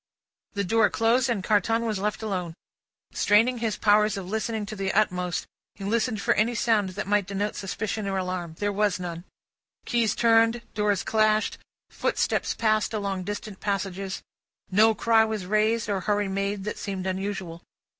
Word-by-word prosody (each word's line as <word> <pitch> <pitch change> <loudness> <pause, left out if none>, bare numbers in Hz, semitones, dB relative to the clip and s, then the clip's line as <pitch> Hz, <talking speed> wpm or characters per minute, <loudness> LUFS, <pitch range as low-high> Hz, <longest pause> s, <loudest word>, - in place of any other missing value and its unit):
The 200 - -1
door 215 +2 +3
closed, 235 +3 +2
and 215 -5 -1
Carton 225 +3 +2
was 215 -4 -1
left 210 +2 -2
alone. 180 -6 -3 0.6
Straining 230 +4 +3
his 225 -3 -1
powers 210 -1 +3
of 190 -2 -6
listening 220 +1 -2
to 215 +1 -7
the 195 -1 -1
utmost, 180 -4 0 0.3
he 200 - -9
listened 220 +2 0
for - - +3
any 230 +3 +1
sound 220 -4 +2
that - - -2
might 205 -1 +1
denote 200 +1 -2
suspicion 210 +1 -3
or 195 -1 -1
alarm. 180 -3 -3
There 205 0 0
was 205 -1 +1
none. 175 -1 -6 0.6
Keys 235 -3 +1
turned, 230 0 +3
doors 210 -2 +1
clashed, 215 -1 +2 0.3
footsteps - - 0
passed 215 0 +1
along 195 -3 -2
distant 205 0 -6
passages: 195 -1 -3 0.5
no 220 +3 +5
cry 225 0 +4
was 220 -4 -3
raised, 215 +3 +1
or 200 -2 0
hurry 205 +1 0
made, 195 +1 -2
that 210 - -4
seemed 190 -2 -4
unusual. 190 -3 -4
205 Hz, 165 wpm, -26 LUFS, 195-220 Hz, 0.6 s, no